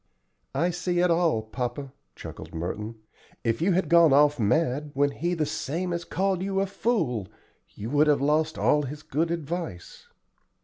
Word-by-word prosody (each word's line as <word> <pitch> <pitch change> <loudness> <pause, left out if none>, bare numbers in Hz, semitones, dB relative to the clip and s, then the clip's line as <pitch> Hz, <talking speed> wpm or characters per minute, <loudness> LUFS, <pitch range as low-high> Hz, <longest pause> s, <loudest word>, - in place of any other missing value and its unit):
"I 175 +2 +2
see 175 +1 -2
it 175 0 +3
all, 165 -10 +2
papa," 125 +4 -5 0.2
chuckled - - -9
Merton; 105 +7 -4 0.5
"if 115 +2 0
you 185 +2 +3
had 185 +2 +1
gone 170 -4 +6
off 145 0 +4
mad 145 +6 +1
when 145 +1 +2
he 175 +5 -2
the 155 -2 0
same 170 +6 -3
as 170 0 -3
called 190 -1 0
you 195 0 -1
a 195 - +2
fool, 165 - -1 0.5
you 110 +4 -6
would 150 +1 +4
have 150 -1 +4
lost 155 +3 +1
all 150 - +3
his 150 +2 -6
good 160 +4 -1
advice." 165 - -5
150 Hz, 170 wpm, -26 LUFS, 135-175 Hz, 0.5 s, gone